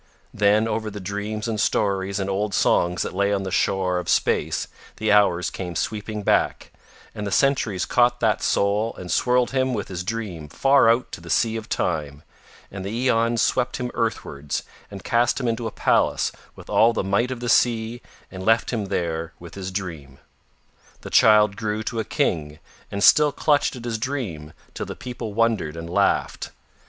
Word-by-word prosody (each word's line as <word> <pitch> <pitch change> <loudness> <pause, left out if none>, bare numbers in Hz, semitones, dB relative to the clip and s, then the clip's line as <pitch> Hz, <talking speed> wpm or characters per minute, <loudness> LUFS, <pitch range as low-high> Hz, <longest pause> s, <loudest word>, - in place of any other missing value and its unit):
Then 105 +2 +3
over 110 -1 -2
the 105 0 -7
dreams 105 +3 -4
and 110 -2 -2
stories 100 0 0
and 95 - -2
old 100 +1 -1
songs 90 0 +2
that - - -5
lay 100 +2 +1
on 100 -1 0
the 95 - -4
shore 90 -1 +1
of 90 - -6
space - - +1 0.3
the 110 -1 0
hours 100 -4 +3
came 90 -2 -6
sweeping 105 +2 -3
back, - - +1 0.4
and 105 -1 -5
the - - -4
centuries 115 -7 +1
caught 120 0 +2
that 110 -4 +1
soul 105 +3 +1
and 90 -1 -7
swirled 125 0 +2
him 130 -1 0
with 105 - -4
his 90 -1 -4
dream 95 -7 -5
far 135 - +4
out 120 +2 +1
to - - -8
the - - -11
Sea 115 -2 +2
of 110 -1 -6
Time, 75 -3 -2 0.5
and 95 -1 -6
the 100 - -4
aeons 115 0 +1
swept 125 - 0
him 125 -1 -4
earthwards 75 -11 -3 0.3
and 100 -1 -9
cast 120 +3 +1
him 125 - -2
into 115 0 -1
a - - -5
palace - - +1 0.2
with - - -13
all 115 +1 +4
the 110 - -1
might 100 +6 +1
of 130 -2 -4
the 120 - -4
sea 115 0 +2 0.3
and 95 0 -7
left 115 +3 +2
him 110 -4 -1
there 85 -3 -3
with 85 -1 -12
his 95 -1 -5
dream. 85 -8 -6 0.8
The - - -9
child 105 -2 +5
grew 110 0 -3
to 115 +1 -3
a - - 0
King 75 -6 -1 0.3
and 100 0 -3
still 150 -1 +6
clutched 145 -1 +1
at 120 -1 -9
his 115 -2 -2
dream 110 - -4 0.2
till - - -5
the - - -6
people 120 -4 -7
wondered 110 -9 +1
and 85 0 -6
laughed. 100 +4 0
105 Hz, 190 wpm, -23 LUFS, 95-115 Hz, 0.8 s, still